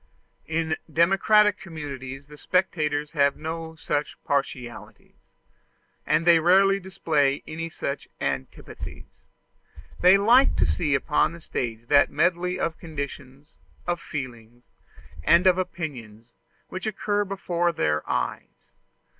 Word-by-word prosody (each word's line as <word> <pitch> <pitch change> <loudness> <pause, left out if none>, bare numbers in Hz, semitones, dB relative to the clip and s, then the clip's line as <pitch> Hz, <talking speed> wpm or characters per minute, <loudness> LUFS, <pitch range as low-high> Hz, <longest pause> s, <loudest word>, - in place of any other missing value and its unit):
In 160 0 -1
democratic 195 +6 +4
communities 140 -6 -7
the 150 0 -13
spectators 150 -5 0
have 140 -2 +2
no 160 +1 -5
such 145 -2 -3
partialities, 120 -6 -4 0.9
and 155 +2 +2
they 170 -1 +7
rarely 195 +4 +4
display 155 -7 0
any 165 +1 -5
such 140 -3 -5
antipathies: 65 -1 -6 0.7
they 180 +2 +7
like 235 +7 +5
to - - +2
see 150 -5 +1
upon 150 +3 +1
the 170 - -10
stage 115 -7 -4
that 140 +3 +5
medley 180 +1 0
of 165 -1 -2
conditions, 140 -2 -8 0.3
of 175 -1 -2
feelings, 120 -4 -7 0.6
and 170 - +5
of 185 0 +5
opinions, 120 -11 -6 0.4
which 185 +3 -5
occurs 205 -1 -1
before 175 -3 -1
their 75 - 0
eyes. - - -4
160 Hz, 115 wpm, -25 LUFS, 135-180 Hz, 0.9 s, they